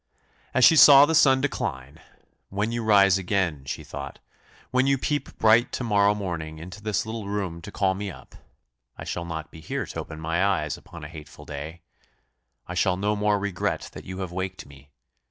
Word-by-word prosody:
As 130 - +6
she 160 - +7
saw 145 -2 +9
the 160 - -1
sun 135 -4 +5
decline, 70 - -4 0.5
"When 105 +3 -2
you 120 0 -2
rise 100 -3 +5
again," 90 -7 -1
she - - -5
thought, - - -8 0.5
"when 130 +1 +2
you 140 0 +3
peep 145 +3 -3
bright 115 +3 +4
to - - -3
morrow 105 -2 +3
morning 85 -6 -5
into 90 +6 -10
this 105 0 -1
little 110 -2 -5
room 95 -5 -3
to 105 - -9
call 95 -2 +1
me 100 +1 -5
up, - - -13 0.6
I - - -7
shall 85 - -4
not 80 -1 -6
be 80 - -12
here - - -3
to - - -7
open 80 - -7
my 80 +3 0
eyes 90 -7 0
upon 85 -1 -12
a - - -6
hateful 80 -1 -12
day 75 +4 -8 0.8
I - - -7
shall 90 -1 +1
no 105 +2 0
more 105 0 +1
regret 100 -3 -3
that - - -10
you 95 +1 -6
have 90 -2 -5
waked 95 +1 -5
me! 70 0 -17
95 Hz, 195 wpm, -25 LUFS, 80-105 Hz, 0.8 s, saw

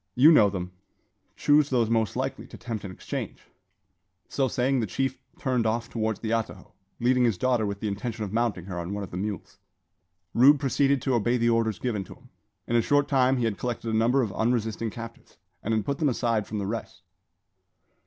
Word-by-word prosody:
You 145 +6 +7
know 105 -10 +6
them: 90 -2 -5 0.6
chose 145 0 +3
those 120 -4 +2
most 115 -1 0
likely 130 +2 -3
to - - -11
tempt 115 -3 -5
an 100 - -6
exchange." - - -6 0.9
So 135 -2 +1
saying, 130 +2 +1
the 110 - -1
chief 135 +7 -2 0.2
turned 125 -5 0
off 115 +2 -2
towards 110 -2 -2
the 110 - -3
atajo, 110 -4 -3 0.3
leading 125 +1 +3
his 115 -6 +2
daughter 120 -1 +1
with 100 0 -5
the 110 - -1
intention 110 +2 -3
of 100 -1 -5
mounting 110 -6 0
her 90 -2 -5
on 85 +4 -4
one 105 - -4
of 95 - -8
the 90 - -5
mules. 100 0 -5 0.7
Rube 140 +4 +6
proceeded 140 0 +1
to 135 - +1
obey 120 +1 +2
the 120 0 +2
orders 115 -3 +1
given 110 -6 -2
him. - - -15 0.4
In 120 - -1
a 120 - +5
short 145 +4 +2
time 130 -1 +3
he 120 - 0
had 110 -3 -2
collected 115 -2 -3
a - - +2
number 120 +4 +3
of 105 -5 -3
unresisting 115 -1 0
captives, 115 -3 -10 0.2
and 110 - -3
had 110 -2 +1
put 140 0 -2
them 150 - +2
aside 115 -4 0
from 110 - -4
the 100 - -2
rest. 110 +3 -5
115 Hz, 205 wpm, -26 LUFS, 105-125 Hz, 0.9 s, You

